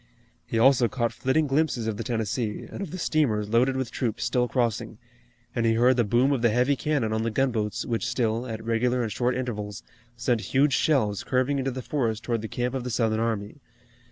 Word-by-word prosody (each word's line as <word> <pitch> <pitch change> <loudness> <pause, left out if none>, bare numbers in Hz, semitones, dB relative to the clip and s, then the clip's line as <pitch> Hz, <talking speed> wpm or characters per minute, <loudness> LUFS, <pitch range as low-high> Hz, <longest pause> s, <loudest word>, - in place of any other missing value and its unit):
He - - -2
also 125 +1 +5
caught 120 0 -1
flitting 140 +4 +1
glimpses 135 -4 0
of 110 -1 -1
the - - -4
Tennessee, 110 -1 -2
and - - -8
of 195 - -4
the 185 - -6
steamers 120 - +1
loaded 125 +4 +2
with 130 -3 -3
troops 115 -4 -2
still 125 +1 +1
crossing, 115 -3 -1 0.6
and 120 - 0
he 115 0 +3
heard 125 +3 +4
the 120 - +3
boom 120 +6 +2
of 135 -4 0
the 120 - +4
heavy 125 +5 +2
cannon 135 -5 0
on 110 - 0
the 115 - 0
gunboats 110 -3 -1
which 115 -2 -1
still, 115 0 -1
at 110 -1 -5
regular 120 +2 +1
and 110 - -3
short 125 +5 0
intervals, 105 -5 -4 0.3
sent 120 -1 0
huge 135 +4 +2
shells 110 -11 +1
curving 130 +2 +1
into 135 0 -1
the 130 0 -5
forest 115 -6 -1
toward 115 -2 -1
the 110 - -4
camp 125 +3 -2
of 130 -2 -3
the 125 - -4
Southern 110 -2 +1
army. 115 +2 -2
120 Hz, 215 wpm, -26 LUFS, 110-130 Hz, 0.6 s, also